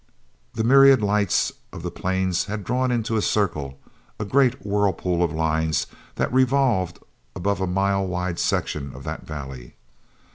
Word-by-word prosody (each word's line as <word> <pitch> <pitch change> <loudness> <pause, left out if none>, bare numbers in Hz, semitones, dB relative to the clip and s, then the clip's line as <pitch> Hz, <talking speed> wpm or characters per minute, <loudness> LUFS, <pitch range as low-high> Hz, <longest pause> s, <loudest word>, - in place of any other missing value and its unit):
The 110 - -1
myriad 135 0 +6
lights 105 -2 +2 0.2
of - - -9
the - - -3
planes 95 -1 -1
had 105 0 -5
drawn 125 +5 0
into 115 -2 0
a - - +1
circle, 75 -11 -1 0.4
a 105 - -2
great 125 -2 +2
whirlpool 95 -4 0
of 85 -3 +1
lines 80 -1 0 0.3
that - - -1
revolved 130 -8 +2 0.4
above 100 0 -1
a 95 - 0
mile 95 +1 +1
wide 90 -1 -3
section 70 -3 -1
of - - -10
that - - -6
valley. 65 -5 -8
95 Hz, 150 wpm, -23 LUFS, 85-115 Hz, 0.4 s, myriad